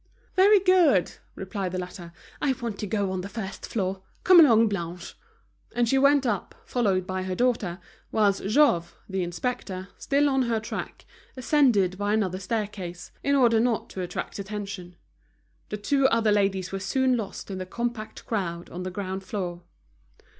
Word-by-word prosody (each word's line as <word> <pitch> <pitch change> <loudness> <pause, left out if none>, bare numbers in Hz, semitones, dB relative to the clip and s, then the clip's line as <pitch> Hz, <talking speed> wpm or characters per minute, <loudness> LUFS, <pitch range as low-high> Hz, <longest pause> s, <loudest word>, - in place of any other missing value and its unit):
"Very 400 +2 +6
good," 360 - +4 0.2
replied 190 -1 -4
the - - -1
latter. 180 -1 -7 0.3
"I 275 - +2
want 235 -5 -5
to 210 - -3
go 200 -1 -1
on 185 -1 -2
the 195 - -7
first 195 -3 -6
floor. 190 -3 -2 0.2
Come 365 -1 +8
along, 230 -8 +7
Blanche." 175 -3 -4 0.6
And 240 -1 +2
she 270 +3 +3
went 280 0 +4
up 240 - -2
followed 195 -7 +1
by 185 0 -3
her 185 0 -3
daughter, 225 -7 0 0.3
whilst 205 -2 +2
Jouve, 205 - +3
the 190 -1 -2
inspector, 185 +1 -4
still 285 +1 +2
on 270 -1 +2
her 235 -3 +1
track, 220 - -6 0.3
ascended 240 - +3
by 205 +1 0
another 190 -4 -1
staircase, 195 -3 -4
in 280 0 +2
order 235 -4 +4
not 235 -1 0
to 190 - -5
attract 180 +3 -5
attention. 195 -3 -6 0.7
The 210 - -3
two 270 +6 +2
other 225 -3 +2
ladies 195 -2 +1
were 195 - -3
soon 255 +6 +1
lost 210 -3 -5
in 190 - -4
the 185 - -5
compact 235 +1 -4
crowd 175 -6 -3
on 180 - -6
the 185 - -3
ground 190 0 -4
floor. 180 -3 -4
205 Hz, 170 wpm, -26 LUFS, 185-240 Hz, 0.7 s, Come